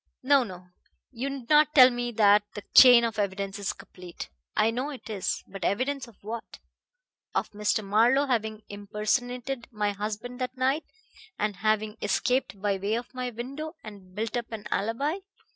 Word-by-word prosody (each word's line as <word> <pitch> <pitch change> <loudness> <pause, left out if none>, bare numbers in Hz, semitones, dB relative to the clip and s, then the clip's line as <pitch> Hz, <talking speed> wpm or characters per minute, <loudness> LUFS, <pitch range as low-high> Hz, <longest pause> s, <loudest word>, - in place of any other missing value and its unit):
No, 275 0 +5
no; 180 -4 -10 0.4
you 260 +2 -3
needn't 295 +3 +3
tell 255 -2 +9
me 240 0 -3
that 210 -1 +5
the 205 - -6
chain 245 -2 +9
of 225 -2 -1
evidence 200 0 -2
is 200 - -1
complete. 180 -1 -10 0.3
I 225 - +4
know 255 +5 -2
it 260 -5 -8
is. 200 -3 -2
But 195 -1 -8
evidence 260 +8 -1
of 225 -4 -19
what? 225 +2 -7 0.8
Of - - -1
Mr. 210 0 0
Marlowe 235 +8 +4
having 220 -4 -1
impersonated 235 +5 -2
my 210 -2 -1
husband 215 +5 -5
that 255 +1 -3
night, 265 +5 +1 0.5
and 210 -2 -1
having 215 +1 0
escaped 205 +1 0
by 200 0 0
way 205 +3 0
of 240 +2 -5
my 255 -1 -3
window, 275 +8 -6
and 195 -4 -12
built 220 +3 -3
up 235 -1 -3
an 220 -2 -6
alibi. 275 - 0
225 Hz, 165 wpm, -27 LUFS, 205-255 Hz, 0.8 s, tell